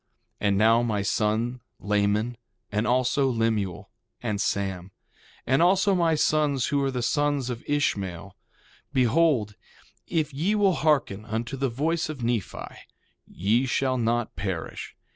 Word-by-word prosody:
1:28 105 - +1
And 100 -1 +2
now 115 +3 +5
my 110 -4 0
son, 110 +5 0 0.2
Laman, 105 +3 0 0.4
and 105 +3 0
also 130 +2 +2
Lemuel 110 -6 -1 0.3
and 105 -4 -1
Sam, 95 -3 -2 0.6
and 135 +4 +2
also 195 +3 +4
my 170 -3 +2
sons 150 -4 +1
who 145 -1 +1
are 135 - +1
the 125 -2 -3
sons 145 -1 0
of 120 -1 -6
Ishmael, 100 - -1 0.6
behold, 130 -4 +2 0.5
if 155 -3 -1
ye 170 +10 0
will 200 -3 +3
hearken 145 - +1
unto 115 +3 -3
the 135 0 -1
voice 155 +7 -1
of 140 -6 -6
Nephi 115 -4 -4 0.4
ye 115 +8 +1
shall 130 0 0
not 120 0 0
perish. 95 -2 -5
120 Hz, 140 wpm, -26 LUFS, 105-145 Hz, 0.6 s, now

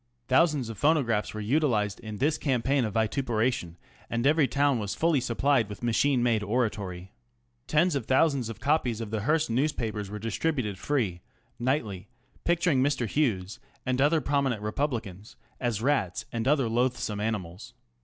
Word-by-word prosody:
Thousands 145 -2 +3
of 110 -3 -7
phonographs 135 -9 +2
were 110 - -4
utilised 110 -4 +1
in 110 -2 -7
this 150 +5 +1
campaign 135 -1 +1
of 105 - -5
vituperation, 110 - 0 0.3
and 115 +2 -1
every 150 0 +4
town 140 0 +2
was 100 -2 -3
fully 165 -3 +2
sup 120 -1 -3
plied 135 -6 +3
with 105 - -9
machine 120 +2 +2
made 115 -3 +2
orator). 105 0 0
^ 90 -1 -7 0.6
Tens 170 +3 +3
of 135 -6 -2
thousands 135 -3 +2
of 115 - -7
copies 140 -6 +1
of 110 -2 -5
the 110 - -1
Hearst 155 +3 +1
newspapers 115 -6 -1
were 105 - -5
distributed 115 - -2
free 105 -10 -1 0.4
nightly 115 -7 -1 0.4
picturing 170 -5 +2
Mr. 135 -3 +1
Hughes 110 -5 -1 0.3
and 130 0 0
other 155 +3 +3
pro 145 0 +1
minent 120 -6 -1
Republicans 105 -4 -3 0.2
as 120 -3 -1
rats 120 -6 0
and 115 +1 -2
other 140 -3 +3
loathsome 120 -2 0
animals. 105 +2 -4
120 Hz, 165 wpm, -28 LUFS, 105-140 Hz, 0.6 s, every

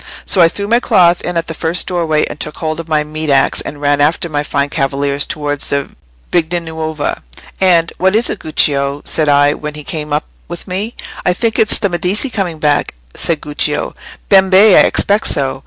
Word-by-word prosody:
So 185 - +2
I 170 - +7
threw 200 +4 -3
my 235 +3 +3
cloth 175 -7 +3
in 175 -1 -3
at 165 - -1
the 165 - -5
first 165 +3 -1
doorway, 165 -4 0
and - - -8
took 150 - -5
hold 155 0 -3
of 165 - -7
my 155 -2 +1
meat 155 +1 -4
axe 135 -1 +2
and 145 - -7
ran 145 0 +1
after 160 +3 +1
my 145 -2 -1
fine 145 -1 -1
cavaliers 140 -1 -1
towards 145 -2 -2
the 140 -1 -1 0.4
Vigna 175 0 +1
Nuova. 160 -2 -4 0.4
And, 175 -3 +3
'What 190 +2 +2
is 230 +2 +2
it, 210 - -3
Guccio?' 140 -2 0
said 155 -2 +3
I, 145 0 +4
when 150 0 -7
he 150 - -8
came 150 -2 -5
up 150 +1 0 0.2
with 175 +3 -8
me. 200 +5 -4 0.3
'I 180 - +2
think 225 +4 -1
it's 220 - +2
the 200 - 0
Medici 185 - -1
coming 185 -7 -2
back,' 145 - 0 0.2
said 165 -3 0
Guccio. 150 0 -1 0.3
Bembè! 190 +1 +6
I - - +6
expected 205 +2 +1
so! 135 -1 -2
160 Hz, 205 wpm, -14 LUFS, 145-180 Hz, 0.4 s, I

